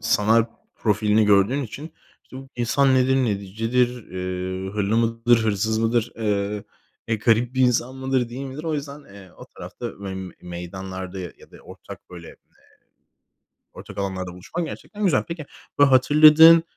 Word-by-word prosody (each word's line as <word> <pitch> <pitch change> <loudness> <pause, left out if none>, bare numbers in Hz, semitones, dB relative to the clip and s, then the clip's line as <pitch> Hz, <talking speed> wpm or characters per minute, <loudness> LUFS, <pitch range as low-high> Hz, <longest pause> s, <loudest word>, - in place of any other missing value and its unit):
sanal 110 +2 +3 0.3
profilini 105 0 +2
gördüğün 105 +7 +3
için 145 +7 -8 0.3
işte 130 - -13
bu 135 0 -10
insan 130 +3 +2
nedir, 130 +1 +3
necidir, 115 +1 0 0.2
eee, 95 +1 -4
hırlı 105 +2 -1
mıdır, 115 0 +2
hırsız 110 +1 0
mıdır, 115 +1 0
eee, 105 -2 -2 0.4
e, 115 - +1
garip 115 +3 +1
bir 130 - 0
insan 125 0 +2
mıdır, 130 -2 -1
değil 135 +3 -6
midir 135 +4 -8
o 160 -2 -1
yüzden, 145 0 -6
eee, 100 -2 -15
o - - -11
tarafta - - -9
ve 95 -1 -5 0.3
meydanlarda 95 +2 -7
ya 90 -2 -11
da - - -15
ortak - - -13
böyle, 85 -2 -10
eee, - - -14 1.4
ortak - - -12
alanlarda 95 -2 -4
buluşmak 160 - -5
gerçekten 210 +5 -8
güzel. 170 -9 +2
Peki, 170 -3 -6 0.3
böyle 145 - +6
hatırladığın, 155 +5 +7
115 Hz, 150 wpm, -23 LUFS, 100-130 Hz, 1.4 s, hatırladığın